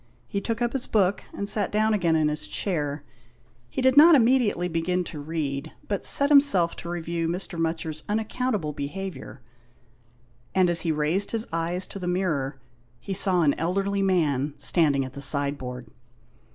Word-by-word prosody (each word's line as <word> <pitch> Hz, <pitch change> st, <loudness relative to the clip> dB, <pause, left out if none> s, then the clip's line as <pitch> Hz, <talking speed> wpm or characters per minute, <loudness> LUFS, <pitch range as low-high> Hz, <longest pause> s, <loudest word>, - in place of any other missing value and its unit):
He 200 Hz, -, -3 dB
took 230 Hz, +3 st, -3 dB
up 240 Hz, -, -1 dB
his 265 Hz, -2 st, -3 dB
book, 200 Hz, -2 st, 0 dB
and 200 Hz, -, -5 dB
sat 205 Hz, -1 st, 0 dB
down 215 Hz, +1 st, +1 dB
again 175 Hz, -6 st, +1 dB
in 155 Hz, -1 st, +2 dB
his 150 Hz, -9 st, -3 dB
chair. 145 Hz, -, -3 dB, 0.7 s
He 260 Hz, -, -4 dB
did 260 Hz, 0 st, +3 dB
not 320 Hz, +2 st, +8 dB
immedi 245 Hz, -3 st, +3 dB
ately 175 Hz, +1 st, -4 dB
begin 180 Hz, +2 st, -1 dB
to 160 Hz, -3 st, -8 dB
read, 145 Hz, -2 st, -4 dB
but 200 Hz, -2 st, -3 dB
set 280 Hz, +1 st, +4 dB
himself 275 Hz, -13 st, +5 dB
to 170 Hz, -, -8 dB
review 170 Hz, -1 st, -3 dB
Mr. 175 Hz, 0 st, -3 dB
Mutcher's 160 Hz, -1 st, -3 dB
unaccountable 215 Hz, -5 st, -2 dB
behaviour, 160 Hz, +1 st, -7 dB, 1.1 s
and 185 Hz, -2 st, +3 dB
as 170 Hz, -, +5 dB
he 165 Hz, -, -1 dB
raised 155 Hz, +6 st, 0 dB
his 225 Hz, 0 st, +1 dB
eyes 170 Hz, +3 st, 0 dB
to 195 Hz, -, -8 dB
the 180 Hz, -, -5 dB
mirror 160 Hz, -7 st, -2 dB, 0.4 s
he 195 Hz, -, -6 dB
saw 185 Hz, -2 st, +5 dB
an 145 Hz, -2 st, +3 dB
elderly 195 Hz, +4 st, -1 dB
man 150 Hz, -7 st, 0 dB
standing 145 Hz, -6 st, +2 dB
at 130 Hz, -, -10 dB
the 140 Hz, -, -7 dB
sideboard. 135 Hz, -3 st, 0 dB
175 Hz, 170 wpm, -25 LUFS, 150-200 Hz, 1.1 s, not